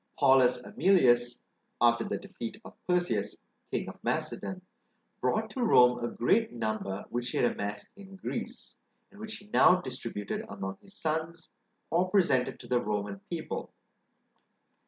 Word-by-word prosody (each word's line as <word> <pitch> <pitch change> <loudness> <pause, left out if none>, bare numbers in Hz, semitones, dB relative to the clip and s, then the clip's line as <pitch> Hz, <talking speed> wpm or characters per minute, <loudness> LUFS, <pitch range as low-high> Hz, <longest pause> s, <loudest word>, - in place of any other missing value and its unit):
Paulus 130 -3 +4
Emilius, 120 -11 +3 0.3
after 120 0 +4
the 100 - -2
defeat 115 - -7
of - - -10
Perseus, 180 0 0 0.3
king - - -2
of - - -10
Macedon, 185 -1 -2 0.6
brought - - 0
to 260 - -4
Rome 125 - +6
a - - +1
great 215 - +2
number 110 -4 -3
which 120 0 -2
he - - -3
had 120 - +3
amassed 100 0 -5
in 195 -1 -12
Greece, 190 - -6 0.3
and 205 - -16
which 220 0 -6
he 205 - -15
now 180 - +7
distributed 105 - -5
among 95 -1 -5
his 200 - -15
sons, 160 +1 -3 0.4
or 180 +2 +2
presented 170 -10 +2
to - - -12
the 125 -1 +2
Roman 100 -1 -2
people. 170 -2 -4
125 Hz, 145 wpm, -30 LUFS, 115-185 Hz, 0.6 s, now